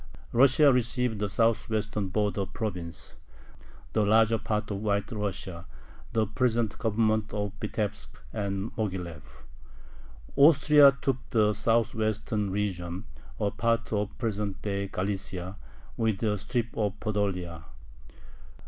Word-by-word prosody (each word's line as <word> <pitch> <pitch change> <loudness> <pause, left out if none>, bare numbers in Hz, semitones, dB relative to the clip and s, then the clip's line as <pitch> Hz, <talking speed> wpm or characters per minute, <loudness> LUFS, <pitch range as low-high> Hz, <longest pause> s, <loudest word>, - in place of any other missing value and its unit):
Russia 135 +3 +6
received 125 -2 0
the 105 0 -1
southwestern 110 -2 0
border 100 0 -1
province: 90 -7 -5 0.8
the 110 - +3
larger 110 +2 +4
part 105 0 -2
of 100 - -2
White 100 0 0
Russia, 95 -5 -4 0.5
the 110 -1 +2
present 115 0 0
Governments 110 -1 +1
of 105 -1 -2
Vitebsk 105 -1 -3
and 100 0 -2
Moghilev. 90 -8 -5 0.9
Austria 145 -1 +7
took 135 -2 +1
the 105 -2 +3
southwestern 110 -1 0
region: 95 -1 -3 0.3
a 105 -2 +1
part 115 0 0
of 105 -1 -2
present 105 -4 -2
day 100 -1 -2
Galicia, 95 -1 -3 0.4
with 110 -2 0
a 105 -2 +2
strip 120 +3 -3
of 105 -3 -1
Podolia. 90 -6 -2
105 Hz, 110 wpm, -28 LUFS, 100-115 Hz, 0.9 s, Austria